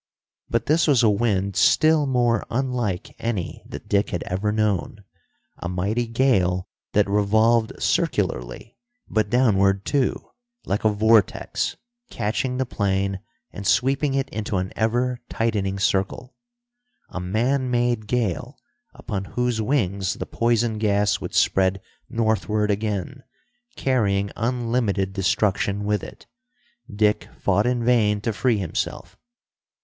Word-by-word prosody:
But 115 Hz, 0 st, 0 dB
this 160 Hz, +3 st, +3 dB
was 135 Hz, -5 st, +4 dB
a 110 Hz, -, +5 dB
wind 100 Hz, -3 st, 0 dB
still 155 Hz, -2 st, +4 dB
more 120 Hz, -3 st, +2 dB
unlike 120 Hz, -7 st, -2 dB
any 105 Hz, -7 st, -3 dB
that -, -, -9 dB
Dick 100 Hz, +1 st, +1 dB
had 90 Hz, -, -3 dB
ever 95 Hz, +4 st, -1 dB
known. 105 Hz, -1 st, -1 dB, 0.6 s
A 85 Hz, -, -4 dB
mighty 100 Hz, +7 st, -1 dB
gale 95 Hz, -8 st, +1 dB, 0.3 s
that 105 Hz, -1 st, +3 dB
revolved 110 Hz, +3 st, +2 dB
circularly, -, -, -1 dB, 0.3 s
but 110 Hz, -2 st, 0 dB
downward 100 Hz, -5 st, +3 dB
too, 140 Hz, -3 st, -1 dB, 0.3 s
like 100 Hz, -, -1 dB
a 110 Hz, -, +4 dB
vortex, 110 Hz, 0 st, +2 dB, 0.3 s
catching 125 Hz, +5 st, -2 dB
the 130 Hz, -, 0 dB
plane 100 Hz, -3 st, -1 dB, 0.3 s
and 100 Hz, -1 st, -6 dB
sweeping 135 Hz, +2 st, +2 dB
it 135 Hz, -1 st, 0 dB
into 105 Hz, -2 st, -3 dB
an 90 Hz, +1 st, -3 dB
ever 120 Hz, +3 st, 0 dB
tightening 100 Hz, -4 st, -1 dB
circle. 100 Hz, +6 st, -1 dB, 0.7 s
A -, -, -5 dB
man 120 Hz, +9 st, 0 dB
made 120 Hz, -3 st, 0 dB
gale, 115 Hz, -8 st, -2 dB, 0.4 s
upon 95 Hz, -1 st, -4 dB
whose 125 Hz, 0 st, -1 dB
wings 100 Hz, -6 st, 0 dB
the -, -, -5 dB
poison 115 Hz, -1 st, 0 dB
gas 105 Hz, -1 st, +1 dB
would -, -, -6 dB
spread 95 Hz, 0 st, +2 dB, 0.3 s
northward 110 Hz, -2 st, 0 dB
again, 105 Hz, +5 st, -3 dB, 0.5 s
carrying 100 Hz, -7 st, +1 dB
unlimited 115 Hz, -5 st, -1 dB
destruction 100 Hz, +1 st, 0 dB
with 105 Hz, 0 st, 0 dB
it. -, -, -11 dB, 0.7 s
Dick 105 Hz, 0 st, +1 dB
fought 100 Hz, +3 st, +2 dB
in 120 Hz, -1 st, 0 dB
vain 110 Hz, -4 st, +3 dB
to 110 Hz, +1 st, -1 dB
free 120 Hz, +1 st, +1 dB
himself. 95 Hz, -5 st, -4 dB
110 Hz, 125 wpm, -23 LUFS, 100-120 Hz, 0.7 s, a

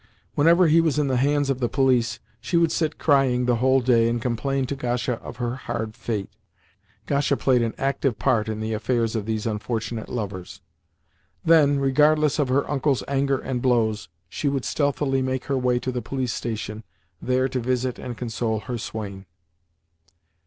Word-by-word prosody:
Whenever 170 Hz, +5 st, +5 dB
he 165 Hz, +1 st, +5 dB
was 160 Hz, -3 st, +1 dB
in 145 Hz, -2 st, +1 dB
the 130 Hz, -, +1 dB
hands 145 Hz, +2 st, +2 dB
of 130 Hz, -, -2 dB
the 120 Hz, -2 st, 0 dB
police, 130 Hz, -3 st, +2 dB, 0.2 s
she 170 Hz, -, -1 dB
would 170 Hz, -1 st, +3 dB
sit 160 Hz, -2 st, -1 dB
crying 135 Hz, -4 st, +3 dB
the 120 Hz, -1 st, +2 dB
whole 130 Hz, +2 st, +3 dB
day, 115 Hz, -2 st, +3 dB
and 120 Hz, 0 st, -1 dB
complain 130 Hz, +3 st, -1 dB
to 140 Hz, -, -3 dB
Gasha 125 Hz, -2 st, -2 dB
of -, -, -9 dB
her 120 Hz, 0 st, -2 dB
hard 115 Hz, -4 st, -4 dB
fate 105 Hz, -4 st, -4 dB, 0.7 s
(Gasha 140 Hz, 0 st, +1 dB
played 130 Hz, -3 st, +2 dB
an 115 Hz, -1 st, -1 dB
active 135 Hz, -3 st, 0 dB
part 110 Hz, -2 st, +1 dB
in 110 Hz, 0 st, -3 dB
the 110 Hz, 0 st, -2 dB
affairs 115 Hz, +1 st, 0 dB
of 110 Hz, -1 st, -3 dB
these 110 Hz, -1 st, -2 dB
unfortunate 110 Hz, +1 st, -3 dB
lovers). 100 Hz, -6 st, -5 dB, 0.9 s
Then, 155 Hz, -4 st, +5 dB
regardless 150 Hz, +3 st, +3 dB
of 145 Hz, -, +2 dB
her 135 Hz, +2 st, +1 dB
uncle's 140 Hz, -2 st, 0 dB
anger 140 Hz, 0 st, +1 dB
and 130 Hz, -2 st, -3 dB
blows, 110 Hz, -6 st, +1 dB, 0.2 s
she 140 Hz, -, -2 dB
would 135 Hz, -5 st, -2 dB
stealthily 140 Hz, -1 st, 0 dB
make 130 Hz, 0 st, -2 dB
her 140 Hz, -, 0 dB
way 125 Hz, -1 st, +2 dB
to 130 Hz, +1 st, -2 dB
the 125 Hz, -1 st, -3 dB
police 130 Hz, -2 st, -3 dB
station, 110 Hz, -1 st, -4 dB, 0.4 s
there 130 Hz, +1 st, +1 dB
to 130 Hz, -, -2 dB
visit 125 Hz, +1 st, -1 dB
and 120 Hz, -2 st, -6 dB
console 115 Hz, -2 st, -2 dB
her 120 Hz, 0 st, -5 dB
swain. 100 Hz, -3 st, -6 dB
125 Hz, 180 wpm, -24 LUFS, 115-140 Hz, 0.9 s, Whenever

